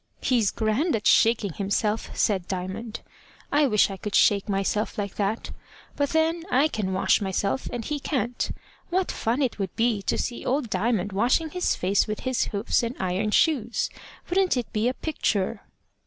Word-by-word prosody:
"He's 235 Hz, -6 st, +2 dB
grand 230 Hz, -, 0 dB
at 210 Hz, -, -4 dB
shaking 220 Hz, -5 st, +4 dB
himself," 210 Hz, +3 st, -1 dB
said 190 Hz, -4 st, +1 dB
Diamond. 190 Hz, +5 st, -4 dB, 0.5 s
"I 290 Hz, 0 st, +4 dB
wish 210 Hz, -4 st, +3 dB
I 195 Hz, -, -6 dB
could 210 Hz, +1 st, -4 dB
shake 200 Hz, 0 st, +4 dB
myself 195 Hz, +2 st, -1 dB
like 200 Hz, -2 st, -3 dB
that. 210 Hz, +2 st, -1 dB, 0.4 s
But 285 Hz, -1 st, 0 dB
then 325 Hz, +1 st, +1 dB
I 285 Hz, +1 st, +3 dB
can 205 Hz, -8 st, -2 dB
wash 190 Hz, +3 st, +2 dB
myself, 200 Hz, +5 st, -1 dB
and 240 Hz, -2 st, -4 dB
he 295 Hz, -1 st, -2 dB
can't. 245 Hz, -4 st, -2 dB, 0.4 s
What 370 Hz, +1 st, 0 dB
fun 240 Hz, +6 st, 0 dB
it 245 Hz, -4 st, -2 dB
would 190 Hz, -2 st, -3 dB
be 225 Hz, -3 st, +1 dB
to -, -, -1 dB
see 240 Hz, -, -3 dB
Old 255 Hz, -4 st, -1 dB
Diamond 210 Hz, -4 st, 0 dB
washing 250 Hz, -, +1 dB
his 360 Hz, -1 st, 0 dB
face 195 Hz, +4 st, +1 dB
with 215 Hz, 0 st, -4 dB
his 255 Hz, -2 st, 0 dB
hoofs 205 Hz, +4 st, 0 dB
and 235 Hz, +1 st, -3 dB
iron 190 Hz, +3 st, 0 dB
shoes! 240 Hz, -2 st, +1 dB, 0.4 s
Wouldn't 370 Hz, -4 st, +2 dB
it 245 Hz, -, -4 dB
be 215 Hz, +2 st, +1 dB
a 255 Hz, -, 0 dB
picture?" 220 Hz, -12 st, -1 dB
225 Hz, 175 wpm, -25 LUFS, 200-260 Hz, 0.5 s, shaking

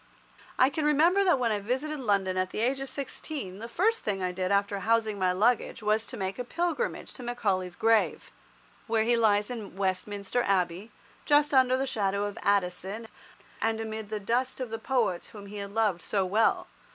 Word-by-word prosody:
I 260 Hz, +2 st, +5 dB
can 310 Hz, -, -2 dB
remember 325 Hz, +7 st, +4 dB
that 360 Hz, -7 st, +4 dB
when 240 Hz, -3 st, +1 dB
I 210 Hz, -, 0 dB
visited 265 Hz, +8 st, -2 dB
London 200 Hz, -6 st, +1 dB
at 185 Hz, 0 st, 0 dB
the -, -, -5 dB
age 265 Hz, +3 st, +1 dB
of 270 Hz, -, -4 dB
sixteen 275 Hz, -, -6 dB
the 230 Hz, -, -6 dB
first 445 Hz, -, +2 dB
thing 195 Hz, -3 st, -2 dB
I 180 Hz, -, 0 dB
did 185 Hz, +1 st, -2 dB
after 200 Hz, 0 st, +1 dB
housing 220 Hz, 0 st, +1 dB
my 185 Hz, -1 st, +2 dB
luggage 220 Hz, +3 st, +1 dB
was 215 Hz, +1 st, +1 dB
to 255 Hz, -, -7 dB
make 190 Hz, +2 st, -3 dB
a -, -, -1 dB
pilgrimage 345 Hz, -, -2 dB
to -, -, -10 dB
Macaulay's 195 Hz, -7 st, -1 dB
grave, 225 Hz, +1 st, +2 dB, 0.6 s
where 225 Hz, -1 st, +2 dB
he 240 Hz, +2 st, +3 dB
lies 210 Hz, -1 st, +2 dB
in 220 Hz, -6 st, -7 dB
Westminster 200 Hz, +4 st, -1 dB
Abbey, 185 Hz, 0 st, 0 dB, 0.4 s
just 295 Hz, 0 st, +4 dB
under 260 Hz, -1 st, +5 dB
the 270 Hz, -, 0 dB
shadow 200 Hz, -5 st, 0 dB
of 205 Hz, -1 st, -5 dB
Addison, 200 Hz, +3 st, -1 dB, 0.5 s
and 225 Hz, 0 st, +1 dB
amid 220 Hz, -1 st, -5 dB
the 215 Hz, -1 st, -3 dB
dust 245 Hz, +6 st, -1 dB
of 250 Hz, -3 st, -4 dB
the 225 Hz, -, -3 dB
poets 230 Hz, -8 st, 0 dB
whom 205 Hz, -3 st, -11 dB
he 205 Hz, +1 st, -8 dB
had 200 Hz, 0 st, -5 dB
loved 205 Hz, -5 st, +1 dB
so 195 Hz, -2 st, 0 dB
well. 210 Hz, +5 st, +2 dB
220 Hz, 195 wpm, -28 LUFS, 200-250 Hz, 0.6 s, I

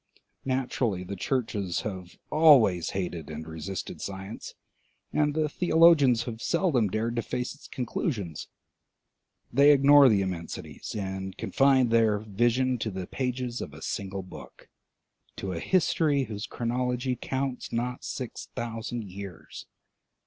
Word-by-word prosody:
Naturally 125 Hz, -7 st, -1 dB
the 100 Hz, +2 st, -6 dB
churches 105 Hz, -5 st, -1 dB
have 95 Hz, -4 st, -7 dB
always 125 Hz, -, +5 dB
hated 90 Hz, -5 st, -4 dB
and 80 Hz, +1 st, -6 dB
resisted 80 Hz, +4 st, -6 dB
science, 95 Hz, +2 st, -7 dB, 0.6 s
and 150 Hz, -1 st, +1 dB
the 155 Hz, -1 st, +2 dB
theologians 155 Hz, -7 st, +5 dB
have 115 Hz, -2 st, -6 dB
seldom 165 Hz, -, +2 dB
dared 110 Hz, +4 st, -2 dB
to -, -, +2 dB
face 125 Hz, +2 st, -3 dB
its 150 Hz, -, -15 dB
conclusions. 110 Hz, -, -3 dB, 1.1 s
They 140 Hz, +3 st, +7 dB
ignore 140 Hz, -1 st, +7 dB
the 100 Hz, -3 st, +3 dB
immensities, 90 Hz, -3 st, -6 dB
and 95 Hz, -1 st, -4 dB
confine 135 Hz, -3 st, +3 dB
their 115 Hz, -2 st, +3 dB
vision 120 Hz, +5 st, +1 dB
to 110 Hz, -, -2 dB
the 95 Hz, -2 st, -5 dB
pages 125 Hz, +1 st, -3 dB
of 75 Hz, -, -7 dB
a 80 Hz, -, -10 dB
single 100 Hz, -1 st, -4 dB
book, 90 Hz, -, -13 dB, 0.7 s
to 95 Hz, -, -4 dB
a 85 Hz, -, -3 dB
history 155 Hz, -, +2 dB
whose 105 Hz, -3 st, -5 dB
chronology 125 Hz, +1 st, -1 dB
counts 130 Hz, +1 st, -3 dB
not 125 Hz, +2 st, -2 dB
six 125 Hz, -3 st, -6 dB
thousand 115 Hz, 0 st, -4 dB
years. 95 Hz, -3 st, -9 dB
115 Hz, 130 wpm, -28 LUFS, 95-130 Hz, 1.1 s, They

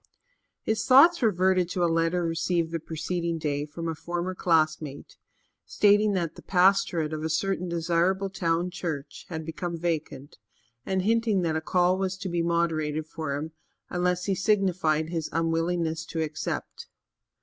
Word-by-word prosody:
His 220 Hz, 0 st, 0 dB
thoughts 285 Hz, +6 st, +7 dB
reverted 185 Hz, -4 st, +2 dB
to 180 Hz, -1 st, -1 dB
a -, -, +5 dB
letter 165 Hz, +2 st, +1 dB
received 165 Hz, 0 st, 0 dB
the 165 Hz, -, -2 dB
preceding 170 Hz, +2 st, -3 dB
day 145 Hz, -2 st, -2 dB
from 165 Hz, +3 st, -6 dB
a 165 Hz, -, -1 dB
former 175 Hz, +3 st, -4 dB
classmate, 155 Hz, -5 st, 0 dB, 0.5 s
stating 205 Hz, 0 st, +3 dB
that 170 Hz, -4 st, -1 dB
the -, -, -13 dB
pastorate 180 Hz, -4 st, +2 dB
of 155 Hz, 0 st, -4 dB
a 160 Hz, -, -1 dB
certain 180 Hz, +2 st, -1 dB
desirable 175 Hz, +3 st, 0 dB
town 170 Hz, -1 st, 0 dB
church 165 Hz, -6 st, -5 dB
had 160 Hz, -2 st, -5 dB
become 170 Hz, +1 st, -4 dB
vacant 155 Hz, -6 st, -4 dB, 0.5 s
and 190 Hz, -1 st, 0 dB
hinting 220 Hz, -3 st, +2 dB
that 160 Hz, -2 st, 0 dB
a 160 Hz, -, -1 dB
call 180 Hz, +2 st, +2 dB
was 190 Hz, -1 st, -2 dB
to 190 Hz, -, -5 dB
be 170 Hz, -1 st, 0 dB
moderated 160 Hz, -2 st, 0 dB
for 155 Hz, -2 st, -4 dB
him 155 Hz, +3 st, -5 dB, 0.4 s
unless 180 Hz, 0 st, 0 dB
he 195 Hz, -, +1 dB
signified 185 Hz, -6 st, +1 dB
his 165 Hz, -2 st, -3 dB
unwillingness 165 Hz, 0 st, 0 dB
to 160 Hz, -1 st, -2 dB
accept. 155 Hz, 0 st, -5 dB
170 Hz, 155 wpm, -27 LUFS, 160-185 Hz, 0.5 s, thoughts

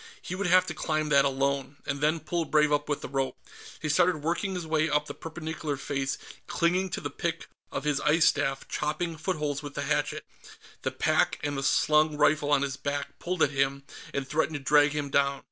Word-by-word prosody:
He -, -, -6 dB
would 190 Hz, +1 st, -1 dB
have 185 Hz, +1 st, +5 dB
to 160 Hz, -, -4 dB
climb 155 Hz, -1 st, -1 dB
that 140 Hz, -2 st, +5 dB
alone, 140 Hz, 0 st, 0 dB
and 140 Hz, -1 st, -3 dB
then 155 Hz, +2 st, +2 dB
pull 165 Hz, +1 st, -1 dB
Brave 150 Hz, -1 st, +3 dB
up 145 Hz, 0 st, +1 dB
with 145 Hz, -, -1 dB
the -, -, -5 dB
rope. 135 Hz, 0 st, -2 dB, 0.5 s
He -, -, 0 dB
started 170 Hz, 0 st, +2 dB
working 180 Hz, +4 st, -1 dB
his 180 Hz, -2 st, -4 dB
way 160 Hz, 0 st, +1 dB
up 150 Hz, 0 st, +1 dB
the -, -, -6 dB
perpendicular 160 Hz, -2 st, -5 dB
face, 135 Hz, 0 st, -2 dB, 0.3 s
clinging 180 Hz, +3 st, +1 dB
by -, -, -4 dB
the -, -, -3 dB
pick -, -, -3 dB, 0.3 s
of 135 Hz, -, -3 dB
his 150 Hz, -2 st, 0 dB
ice 160 Hz, +2 st, +4 dB
staff, 135 Hz, -2 st, +1 dB
chopping 165 Hz, +3 st, -2 dB
footholds 150 Hz, -4 st, -2 dB
with 145 Hz, -1 st, -8 dB
the -, -, -2 dB
hatchet; -, -, -1 dB, 0.6 s
the -, -, 0 dB
pack -, -, +1 dB
and 145 Hz, -1 st, -1 dB
the 135 Hz, -, -2 dB
slung 150 Hz, +2 st, +3 dB
rifle 150 Hz, 0 st, +3 dB
on 140 Hz, -1 st, +4 dB
his 135 Hz, -2 st, -3 dB
back 140 Hz, 0 st, -4 dB
pulled 180 Hz, -1 st, 0 dB
at -, -, +3 dB
him 135 Hz, 0 st, 0 dB, 0.3 s
and 140 Hz, -1 st, -3 dB
threatened 160 Hz, +2 st, 0 dB
to 140 Hz, -, -11 dB
drag 145 Hz, +1 st, +5 dB
him 145 Hz, -2 st, -3 dB
down. 140 Hz, 0 st, +2 dB
150 Hz, 215 wpm, -28 LUFS, 140-160 Hz, 0.6 s, have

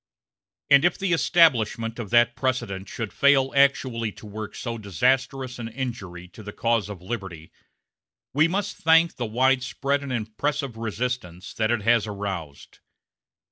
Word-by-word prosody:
And 140 Hz, +1 st, +7 dB
if 175 Hz, -, +2 dB
the 190 Hz, -2 st, 0 dB
establishment 120 Hz, -10 st, +2 dB
of 110 Hz, -4 st, -5 dB
that 120 Hz, 0 st, +4 dB
precedent 100 Hz, -8 st, -2 dB
should 115 Hz, -3 st, -5 dB
fail 135 Hz, -1 st, +3 dB
actually 130 Hz, -5 st, +2 dB
to -, -, -13 dB
work 105 Hz, 0 st, -7 dB
so 115 Hz, -2 st, -5 dB
disastrous 125 Hz, -, 0 dB
an 115 Hz, -, -4 dB
injury 110 Hz, -8 st, -6 dB
to 110 Hz, -, -13 dB
the 105 Hz, -1 st, -8 dB
cause 115 Hz, -1 st, 0 dB
of 95 Hz, -4 st, -8 dB
liberty, 95 Hz, -7 st, -6 dB, 0.8 s
we 155 Hz, +4 st, +4 dB
must 200 Hz, +3 st, -2 dB
thank 165 Hz, +1 st, +4 dB
the 120 Hz, -, -2 dB
wide 130 Hz, +4 st, +2 dB
spread 140 Hz, +3 st, -1 dB
and 140 Hz, -2 st, -6 dB
impressive 125 Hz, +4 st, -2 dB
resistance 115 Hz, -5 st, -4 dB
that 110 Hz, -1 st, 0 dB
it 120 Hz, -3 st, 0 dB
has 115 Hz, -1 st, +3 dB
aroused. 95 Hz, -8 st, -6 dB
120 Hz, 150 wpm, -24 LUFS, 105-135 Hz, 0.8 s, And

